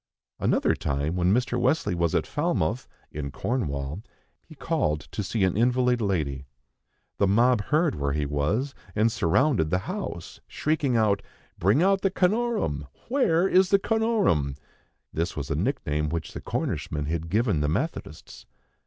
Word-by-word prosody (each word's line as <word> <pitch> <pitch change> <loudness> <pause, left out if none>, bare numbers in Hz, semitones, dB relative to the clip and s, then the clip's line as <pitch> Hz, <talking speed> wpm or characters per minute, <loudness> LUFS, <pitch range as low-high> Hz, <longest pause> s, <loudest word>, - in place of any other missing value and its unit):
Another - - +2
time, 70 +4 -2
when 90 0 +2
Mr. 125 +2 +1
Wesley 130 - +1
was 85 -2 0
at - - +1
Falmouth 115 +12 -1 0.2
in 70 -1 -4
Cornwall, 75 - -3 0.4
he 155 - -15
called 105 - -1
to - - -3
see 105 +1 -1
an 95 -2 +2
invalid 125 +1 +2
lady. 75 -9 -1 0.7
The 100 - +4
mob 115 +2 +3
heard 155 +1 +2
where 70 -1 -2
he 75 0 0
was, 85 - -1 0.2
and 110 +2 +3
surrounded 110 - +2
the 90 - +2
house, 185 - -5
shrieking 145 -5 0
out: 105 -3 +2 0.4
"Bring 105 - +3
out 195 0 +3
the 195 - +2
Canorum! 190 - 0 0.2
Where 190 -10 +3
is 185 -1 +4
the 200 - +6
Canorum?" 205 - +1 0.6
This 85 +2 -2
was 70 -3 -4
a - - +1
nickname 75 +1 -1
which 80 0 -4
the - - -6
Cornishmen 75 -1 -3
had 80 +1 -3
given 105 -3 +1
the 75 0 +1
Methodists. 80 - -4
105 Hz, 155 wpm, -26 LUFS, -, 0.7 s, the